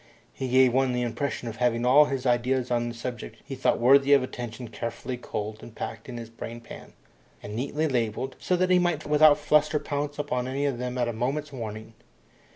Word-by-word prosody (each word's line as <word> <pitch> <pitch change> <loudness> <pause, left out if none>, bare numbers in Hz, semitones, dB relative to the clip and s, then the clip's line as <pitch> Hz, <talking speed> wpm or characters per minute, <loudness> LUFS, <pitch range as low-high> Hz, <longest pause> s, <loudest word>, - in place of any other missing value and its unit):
He 130 - -4
gave 130 -1 +4
one 130 -1 +2
the 125 0 0
impression 125 +1 -3
of 115 -1 -6
having 120 -1 +1
all 140 +4 +7
his 135 -2 -3
ideas 125 +1 +1
on 120 0 +1
the 120 - -7
subjects 120 0 -6
he 140 - -7
thought 130 - +1
worthy 135 +3 +6
of 140 -2 +5
attention 120 -2 -6
carefully 115 +3 -5
culled 110 -2 -5
and 115 - -12
packed - - -6
in 120 - -6
his 115 -1 -8
brain 115 0 -7
pan, 120 - -12 0.5
and 105 +1 -6
neatly 145 +6 -1
labelled, 125 0 -1
so 180 - 0
that 185 +1 +1
he 180 - +6
might 175 -4 0
without 150 0 +6
fluster 150 +1 +2
pounce 145 0 -3
upon 125 -4 -2
any 135 +2 -1
of 135 -4 -1
them 125 0 -3
at 120 -1 +1
a 120 - -2
moment's 140 +6 -2
warning. 110 -2 -7
125 Hz, 210 wpm, -26 LUFS, 120-145 Hz, 0.5 s, all